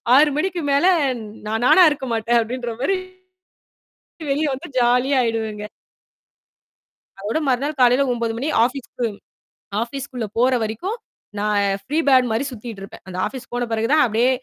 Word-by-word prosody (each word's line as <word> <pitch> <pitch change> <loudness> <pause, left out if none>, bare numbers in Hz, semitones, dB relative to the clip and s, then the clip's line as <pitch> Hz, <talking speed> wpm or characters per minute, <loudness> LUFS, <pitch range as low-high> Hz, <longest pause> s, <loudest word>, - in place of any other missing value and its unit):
6:00 295 +2 +6
மணிக்கு 360 +1 -1
மேலே 345 +7 +4 0.3
ந் - - -8 0.2
நான் 225 +2 -1
நானா 370 - +7
இருக்கமாட்டேன் 240 -4 0
அப்பிடின்றமாரி 245 +8 -2 1.3
வெளிய 300 +3 +1
வந்து 270 - -8
ஜாலியா 250 +3 +3
ஆயிடுவேங்க. 220 -2 -3 1.5
அதோட 210 +9 -2
மறுநாள் 275 +3 -1
காலையில 250 +3 +5
9:00 230 -1 -2
மணி 275 +5 -2 0.2
ஆஃபீஸுக்கும் 240 -4 -3 0.7
ஆஃபீஸ்குள்ளே 245 -2 -5
போற 255 +1 +4
வரைக்கும் 230 - -3 0.4
நான் 205 -1 +1 0.2
ஃப்ரீ 300 +4 -2
பேட் 255 -2 +5
மாரி 225 +5 0
சுத்திட்டு 225 -3 -8
இருப்பேன். 195 - -11
அந்த 180 - -7
ஆஃபீஸ் 260 -1 -7
போன 245 0 -1
பிறகு 225 0 0
தான் 310 - +5
அப்பிடியே 235 +2 +2
245 Hz, 135 wpm, -21 LUFS, 225-275 Hz, 1.5 s, நானா